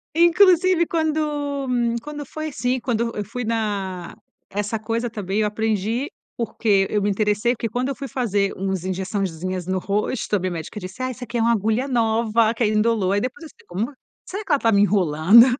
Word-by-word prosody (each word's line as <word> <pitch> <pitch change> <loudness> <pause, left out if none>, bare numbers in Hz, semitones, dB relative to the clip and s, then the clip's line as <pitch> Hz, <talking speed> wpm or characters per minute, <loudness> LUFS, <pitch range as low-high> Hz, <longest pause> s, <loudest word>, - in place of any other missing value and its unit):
Inclusive, 345 0 +5
quando 300 -4 -1 0.3
quando 295 +2 -6
foi, 310 +3 -5
assim, 250 -1 -1
quando 235 -1 -1
eu 210 - -2
fui 240 +4 -5
na 205 -6 -2 0.3
essa 205 +2 -2
coisa 230 +2 -2
também 205 -2 -2
eu 210 - +2
aprendi, 220 - -1 0.3
porque 210 -4 +1
eu 210 - +1
me 205 - +1
interessei, 210 +4 +1
porque 230 -1 -3
quando 245 +5 -1
eu 275 - -2
fui 275 +1 -6
fazer 205 -6 0
umas 190 -2 -2
injeçãozinhas 185 -1 -3
no 190 - 0
rosto 205 +4 -1
a - - +2
minha 185 0 -2
médica 170 +5 -5
disse: 185 +5 -8
"Ah, 255 - 0
essa 250 0 -7
aqui 240 +1 -4
é - - +1
uma 230 +1 +4
agulha 220 +4 +1
nova 225 -2 +2
que 235 - 0
ainda 215 -1 +2
indolor". 210 -4 +2
Aí, 205 - +2
depois 260 +9 -4
eu - - -7
disse: - - -23
"Como? 210 +10 -3 0.3
Será 400 +3 -5
que - - -5
ela 290 - +4
tá 230 - +3
me 200 -2 +4
enrolando? 195 +2 +6
220 Hz, 200 wpm, -22 LUFS, 200-255 Hz, 0.3 s, enrolando